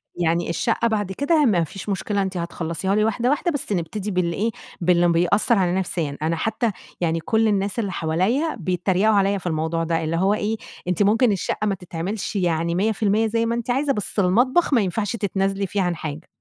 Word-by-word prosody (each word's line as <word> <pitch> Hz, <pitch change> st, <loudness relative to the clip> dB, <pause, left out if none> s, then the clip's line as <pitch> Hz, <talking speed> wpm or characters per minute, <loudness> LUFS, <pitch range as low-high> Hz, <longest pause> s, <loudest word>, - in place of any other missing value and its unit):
يعني 170 Hz, 0 st, 0 dB
الشقة 230 Hz, +6 st, +1 dB
بعد 205 Hz, -4 st, -1 dB
كده 290 Hz, -, +2 dB
ما 180 Hz, -7 st, +3 dB
فيش 195 Hz, +5 st, -7 dB
مشكلة 200 Hz, +1 st, -1 dB
أنتِ 190 Hz, -1 st, -2 dB
هتخلّصيها 170 Hz, +3 st, -2 dB
لي 215 Hz, -, +3 dB
واحدة، 225 Hz, +3 st, +1 dB
واحدة 295 Hz, +5 st, +1 dB
بس 285 Hz, -8 st, -4 dB
نبتدي 200 Hz, +3 st, -2 dB
بال 175 Hz, -2 st, 0 dB
إيه 220 Hz, +5 st, 0 dB, 0.3 s
باللي 175 Hz, 0 st, +4 dB
بيأثر 175 Hz, +7 st, +3 dB
عليَّ 180 Hz, -2 st, +2 dB
نفسيًا، 170 Hz, -6 st, -2 dB
أنا 165 Hz, +2 st, 0 dB
حتى 225 Hz, +5 st, -1 dB, 0.3 s
يعني 165 Hz, -1 st, +1 dB
كُلّ 220 Hz, +7 st, +1 dB
الناس 200 Hz, +1 st, 0 dB
اللي 200 Hz, -4 st, -1 dB
حواليَّ 185 Hz, -, 0 dB
بيتريقوا 185 Hz, +4 st, +1 dB
عليَّ 200 Hz, 0 st, +2 dB
في 180 Hz, -, -6 dB
الموضوع 160 Hz, +1 st, -1 dB
ده، 165 Hz, 0 st, 0 dB
اللي 160 Hz, +1 st, -1 dB
هو 195 Hz, +4 st, +3 dB
إيه 215 Hz, +1 st, -1 dB, 0.3 s
أنتِ 180 Hz, +3 st, +2 dB
ممكن 225 Hz, +4 st, +4 dB
الشقة 205 Hz, +2 st, -1 dB
ما 200 Hz, -, +1 dB
تتعملش 180 Hz, +4 st, -5 dB
يعني 170 Hz, -2 st, 0 dB
100% 215 Hz, +2 st, +1 dB
زي 230 Hz, +1 st, 0 dB
ما 230 Hz, -, 0 dB
أنتِ 235 Hz, +1 st, -4 dB
عايزة، 275 Hz, +3 st, +1 dB
بس 210 Hz, -2 st, -3 dB
المطبخ 250 Hz, -, +3 dB
ما 235 Hz, -, +5 dB
ينفعش 205 Hz, +3 st, -1 dB
تتنازلي 195 Hz, -2 st, -1 dB
فيه 200 Hz, +2 st, -1 dB
عن 180 Hz, -2 st, 0 dB
حاجة. 155 Hz, +1 st, -6 dB
195 Hz, 200 wpm, -22 LUFS, 170-220 Hz, 0.3 s, ما